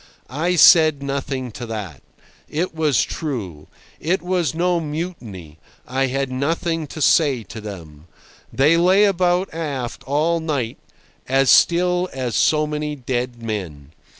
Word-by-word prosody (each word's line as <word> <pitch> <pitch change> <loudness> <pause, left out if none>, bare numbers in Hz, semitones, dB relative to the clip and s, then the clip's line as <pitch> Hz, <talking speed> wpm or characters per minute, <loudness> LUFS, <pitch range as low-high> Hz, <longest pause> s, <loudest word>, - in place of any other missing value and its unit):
I 165 +6 0
said 155 -4 +6
nothing 135 -2 -3
to 120 +2 -8
that. 105 -10 -6 0.5
It 165 +4 -2
was 155 -4 +2
true. 105 - -5 0.3
It 175 +5 -1
was 175 -5 -1
no 175 +1 +1
mutiny. 140 - -6 0.3
I 135 +1 0
had 135 0 -2
nothing 160 +4 -2
to 155 - -9
say 140 -8 +3
to 110 +2 -9
them. 85 -7 -10 0.4
They 150 +5 +3
lay 185 +4 +4
about 180 -2 +1
aft 140 -7 -4
all 155 +5 +1
night, 140 -8 -3 0.5
as 135 0 +3
still 180 +1 +3
as 130 -3 -3
so 155 -1 +3
many 150 0 -3
dead 125 -2 -4
men. 85 -11 -5
140 Hz, 135 wpm, -21 LUFS, 120-165 Hz, 0.5 s, said